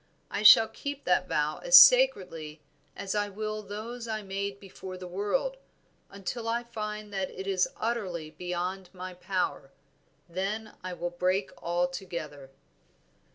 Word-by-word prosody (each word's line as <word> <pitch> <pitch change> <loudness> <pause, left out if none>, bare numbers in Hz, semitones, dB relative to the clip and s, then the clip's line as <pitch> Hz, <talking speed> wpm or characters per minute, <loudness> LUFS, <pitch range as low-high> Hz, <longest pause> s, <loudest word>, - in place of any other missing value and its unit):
I - - -2
shall 215 +1 +9
keep 285 +3 -6
that - - +1
vow - - 0
as - - +8
sacredly 430 - +6 0.4
as 195 -1 -4
I 205 -1 0
will 215 +1 -4
those 225 +4 -7
I 215 -1 -3
made 200 0 -4
before 190 -2 -9
the 180 - -8
world, 205 - -1 0.5
until 200 +4 -5
I 235 +1 0
find 210 -2 -6
that 190 -1 -2
it 190 - -8
is 190 -2 +1
utterly 185 -9 -3
beyond 180 +3 -4
my 185 0 -7
power, 180 -6 -2 0.6
then 200 +5 -3
I 185 0 -4
will 175 0 -4
break 185 +3 0
all 175 +1 +1
together." 170 -6 -7
195 Hz, 145 wpm, -29 LUFS, 180-215 Hz, 0.6 s, shall